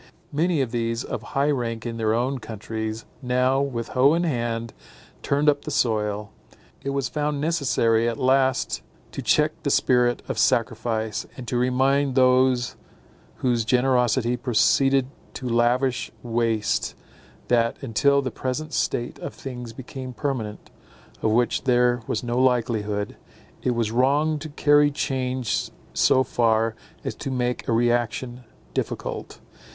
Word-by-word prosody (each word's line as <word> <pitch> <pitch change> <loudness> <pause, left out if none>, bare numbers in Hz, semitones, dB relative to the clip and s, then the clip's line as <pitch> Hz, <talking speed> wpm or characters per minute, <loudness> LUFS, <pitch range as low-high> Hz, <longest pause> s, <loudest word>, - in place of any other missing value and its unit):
Many 160 +1 +1
of 125 -4 -2
these, 115 0 -1
of 115 - -4
high 140 +5 0
rank 115 -4 -2
in 115 -1 -4
their 110 -1 +1
own 125 +4 0
countries, 110 0 -5 0.2
now, 130 +1 +2
with 120 -5 -3
hoe 135 +4 +4
in 170 - +1
hand, 115 -6 -2 0.5
turned 145 +2 0
up 145 -1 +4
the - - -6
soil. 105 -5 0 0.5
It 140 - -2
was 140 -1 -1
found 150 -1 -2
necessary 120 -7 +2
at 115 - -4
last 130 0 +2 0.3
to - - -5
check - - +2
the - - -1
spirit 125 -1 +2
of - - -3
sacrifice, 110 -2 0
and 125 -3 -8
to 125 - -2
remind 130 +2 +2
those 130 -1 +3 0.7
whose 120 -2 +2
generosity 125 0 +2
proceeded 135 +2 +3 0.3
to 130 - -5
lavish 120 +2 +1
waste, 115 -2 0 0.5
that, 115 -1 +2
until 140 +4 +2
the 130 - -2
present 145 +7 -4
state 120 +1 -1
of - - -6
things 125 -3 -7
became 130 +1 -8
permanent, 120 -6 -4 0.5
of 110 - +2
which 120 +2 +1
there 125 -1 +3
was 110 - -2
no 120 +1 -1
likelihood, 115 -5 0 0.4
it 125 - 0
was 115 -2 0
wrong 145 +6 +2
to 155 +1 -7
carry 145 0 +4
change 130 - -1 0.2
so 130 - +4
far 115 -2 +1 0.3
as - - -3
to - - -6
make 125 -1 -2
a - - 0
reaction 120 +1 0 0.3
difficult. - - -4
125 Hz, 140 wpm, -24 LUFS, 115-135 Hz, 0.7 s, hoe